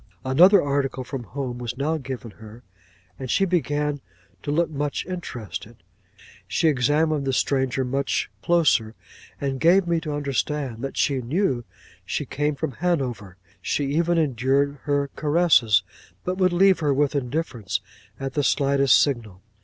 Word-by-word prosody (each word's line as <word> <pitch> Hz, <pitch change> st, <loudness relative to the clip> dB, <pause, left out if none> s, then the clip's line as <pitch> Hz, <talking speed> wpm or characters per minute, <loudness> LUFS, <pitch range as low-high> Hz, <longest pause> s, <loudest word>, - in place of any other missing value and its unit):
'Another 180 Hz, +10 st, +6 dB
article 140 Hz, -2 st, -1 dB
from 125 Hz, -1 st, -6 dB
home 125 Hz, +1 st, -5 dB
was 120 Hz, 0 st, -5 dB
now 150 Hz, +4 st, 0 dB
given 130 Hz, -4 st, -7 dB
her, 110 Hz, +3 st, -13 dB, 0.6 s
and 130 Hz, -, -6 dB
she 195 Hz, -, +3 dB
began 150 Hz, -4 st, -1 dB, 0.4 s
to -, -, -6 dB
look 165 Hz, +3 st, +2 dB
much 145 Hz, -1 st, -2 dB
interested; 120 Hz, -, -6 dB, 0.7 s
she 165 Hz, -, +1 dB
examined 150 Hz, +2 st, +2 dB
the 135 Hz, -, 0 dB
stranger 130 Hz, 0 st, 0 dB
much 135 Hz, +2 st, -1 dB
closer, 145 Hz, -10 st, +2 dB, 0.4 s
and 135 Hz, -2 st, -2 dB
gave 175 Hz, +6 st, +5 dB
me 170 Hz, -1 st, +1 dB
to 155 Hz, -3 st, -4 dB
understand 140 Hz, -3 st, -2 dB
that 135 Hz, -, -5 dB
she 135 Hz, -2 st, +1 dB
knew 130 Hz, -1 st, 0 dB, 0.4 s
she -, -, -3 dB
came 150 Hz, +1 st, -1 dB
from 150 Hz, +1 st, -3 dB
Hanover; 125 Hz, -, -2 dB, 0.2 s
she 140 Hz, +8 st, -1 dB
even 170 Hz, +1 st, +2 dB
endured 140 Hz, 0 st, +1 dB
her 145 Hz, -1 st, 0 dB
caresses, 145 Hz, -, +3 dB, 0.4 s
but 180 Hz, -, -2 dB
would 185 Hz, -1 st, +3 dB
leave 190 Hz, +2 st, +4 dB
her 145 Hz, -3 st, +1 dB
with 145 Hz, 0 st, +1 dB
indifference 125 Hz, -, -2 dB, 0.4 s
at 135 Hz, -1 st, -4 dB
the 145 Hz, -, 0 dB
slightest 140 Hz, 0 st, +4 dB
signal. 110 Hz, -9 st, -1 dB
140 Hz, 145 wpm, -24 LUFS, 125-155 Hz, 0.7 s, Another